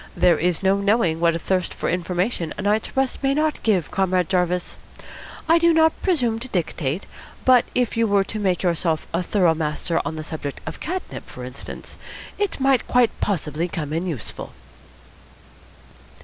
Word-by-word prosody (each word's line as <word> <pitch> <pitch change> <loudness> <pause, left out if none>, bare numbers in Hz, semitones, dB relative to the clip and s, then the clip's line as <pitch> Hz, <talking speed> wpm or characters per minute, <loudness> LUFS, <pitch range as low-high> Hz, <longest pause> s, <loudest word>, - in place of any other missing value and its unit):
There 175 -3 +4
is 175 +2 0
no 195 +1 +4
knowing 200 -5 +2
what 170 0 +2
thirst 185 +1 -1
for - - -3
information 180 0 -1
a - - -4
night's 210 +5 0
rest 270 -1 0
may 275 0 +2
not 305 0 0
give 195 -8 +1
Comrade 185 -2 +1
Jarvis. 180 -1 0 0.7
I 330 +1 +5
do 340 0 +5
not 320 0 +3
presume 245 - +1
to 250 - -4
dictate, 170 - -2 0.4
but 255 -2 +6
if 250 -2 +1
you 230 0 +2
were 200 -1 +3
to 215 +2 -5
make 190 -3 0
yourself 170 -2 0
a 170 - +1
thorough 180 -2 +3
master 160 +1 -1
of 160 - -3
the 155 - -5
subject 150 -3 -5
of - - -6
catnip, 365 +3 -5
for - - -8
instance, - - -9 0.4
it 405 -7 -1
might 270 -2 +2
quite 245 -1 +4
possibly 165 -4 -1
come 155 -4 -4
in 170 +3 -1
useful." 150 -10 -6
185 Hz, 170 wpm, -23 LUFS, 170-240 Hz, 0.7 s, but